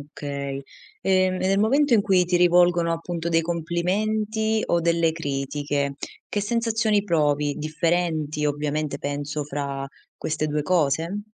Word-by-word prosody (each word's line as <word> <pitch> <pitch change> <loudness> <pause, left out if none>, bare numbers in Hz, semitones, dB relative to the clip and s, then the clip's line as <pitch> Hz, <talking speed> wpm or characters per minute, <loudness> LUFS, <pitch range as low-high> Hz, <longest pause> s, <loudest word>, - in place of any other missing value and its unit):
Okay, 140 -1 -5 0.4
ehm, 185 -1 +3
e - - -2
nel 195 - +2
momento 270 +6 +3
in 220 - +6
cui 190 -3 +3
ti 175 0 +1
rivolgono 175 -1 +4
appunto 165 0 -3
dei 165 0 +2
complimenti, 210 +6 -1
o 170 - +1
delle 170 -1 +2
critiche, 140 -1 -2 0.3
che 205 - -2
sensazioni 225 -1 +1
provi? 150 -4 +1
Differenti 155 -1 0
ovviamente 150 0 -2
penso 145 +1 -3
fra 140 -1 -4 0.3
queste 155 0 -2
2 150 0 -1
cose? 165 +3 +1
165 Hz, 130 wpm, -24 LUFS, 145-185 Hz, 0.4 s, in